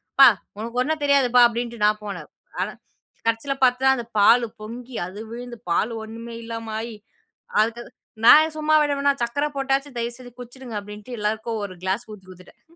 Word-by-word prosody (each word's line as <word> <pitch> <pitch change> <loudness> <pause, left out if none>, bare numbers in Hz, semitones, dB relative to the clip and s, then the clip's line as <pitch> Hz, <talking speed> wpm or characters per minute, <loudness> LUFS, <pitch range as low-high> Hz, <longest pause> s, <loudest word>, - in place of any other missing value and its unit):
அப்பா! 275 -2 +10 0.3
உனக்கு 230 +3 -3
ஒன்னும் 310 +2 -2
தெரியாதுப்பா'' 250 -4 +5
அப்பிடின்ட்டு 235 -1 -4
நான் 215 0 +2
போனேன். 200 - -7 0.3
ஆனா, - - -1 0.6
கடைசில 230 +5 0
பார்த்தா 260 +2 +4
அந்த 240 -2 -5
பாலு 235 +4 +6
பொங்கி 240 +3 -8
அது 190 +3 -9
விழுந்து 240 0 -7
பாலு 220 +7 +1
ஒன்னுமே 230 +1 -8
இல்லாம 230 -1 -6
ஆயி 230 -2 -7 0.6
அதுக்கு 230 +2 -1 0.4
நான் 310 +5 +8
சும்மா 310 0 +2
விடுவனா 285 -1 +2
சர்க்கர 280 +5 -1
போட்டாச்சு 275 +1 0
தயவுசெஞ்சு 240 +1 -5
குடிச்சிடுங்க 245 -2 -8
அப்பிடின்ட்டு 210 +4 -9
எல்லாருக்கும் 220 +1 -2
ஒரு 190 - -8
கிளாஸ் 195 +6 -2
ஊத்தி 200 -3 -12
குடுத்துட்டேன். 185 0 -16
235 Hz, 155 wpm, -23 LUFS, 220-260 Hz, 0.6 s, அப்பா